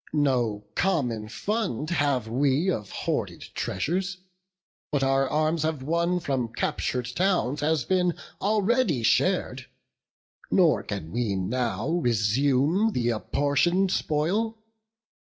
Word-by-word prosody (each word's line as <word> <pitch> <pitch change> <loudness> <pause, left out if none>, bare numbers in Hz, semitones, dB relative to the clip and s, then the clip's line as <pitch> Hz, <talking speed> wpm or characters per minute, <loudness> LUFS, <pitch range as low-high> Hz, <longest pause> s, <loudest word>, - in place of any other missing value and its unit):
no 120 -8 +1
common 125 - 0
fund 180 - -2
have 140 -8 +1
we 140 +9 +2
Of 105 - -4
hoarded - - -3
treasures; 180 - -2 0.7
what 145 -2 0
our 135 0 +2
arms 155 +1 +1
have 155 -3 -1
won 170 +4 +1
From 130 -7 -2
captur'd 125 +1 -2
towns, 175 -8 +1
has 150 -4 +1
been 180 -2 +1 0.2
already 205 - +2
shar'd, - - +1 0.8
Nor - - +4
can 80 - -6
we 115 -4 -1
now 110 +3 -1
resume 135 - +2
th' 120 - 0
apportion'd 160 - +1
spoil. 195 +11 0
145 Hz, 110 wpm, -26 LUFS, 120-180 Hz, 0.8 s, Nor